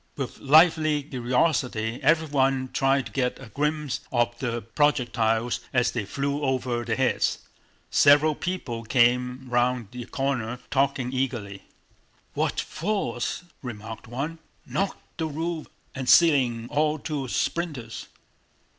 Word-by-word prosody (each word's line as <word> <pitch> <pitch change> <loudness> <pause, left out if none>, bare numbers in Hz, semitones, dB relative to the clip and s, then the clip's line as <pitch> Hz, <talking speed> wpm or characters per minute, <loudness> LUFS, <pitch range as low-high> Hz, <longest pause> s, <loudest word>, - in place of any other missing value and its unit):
With 135 -3 -5
lively 155 0 +5
curiosity 125 -3 0
everyone 135 -4 +2
tried 135 -1 +2
to 115 - -9
get 125 +2 -1
a 135 -4 -11
glimpse 150 +3 -1
of 120 -1 +1
the 120 -2 -2
projectiles 120 -3 +1
as 125 -1 +3
they 115 -4 -3
flew 140 +6 -2
over 130 -3 -1
their 115 -1 -1
heads. 130 0 +1 0.5
Several 145 +2 +6
people 145 -9 -4
came 125 +2 +2
round 120 -2 +1
the 125 -1 -7
corner 125 -4 -2
talking 135 -2 +1
eagerly. 120 -7 -3 0.7
"What - - 0
force!" 170 - -2 0.2
remarked 110 -3 -7
one. 140 +8 -4 0.3
"Knocked 195 -2 -4
the 160 - 0
roof 160 +1 -3 0.3
and 130 -2 -3
ceiling 125 -7 +5
all 150 +1 +2
to 145 -3 -4
splinters!" 135 -6 -3
130 Hz, 120 wpm, -26 LUFS, 120-150 Hz, 0.7 s, Several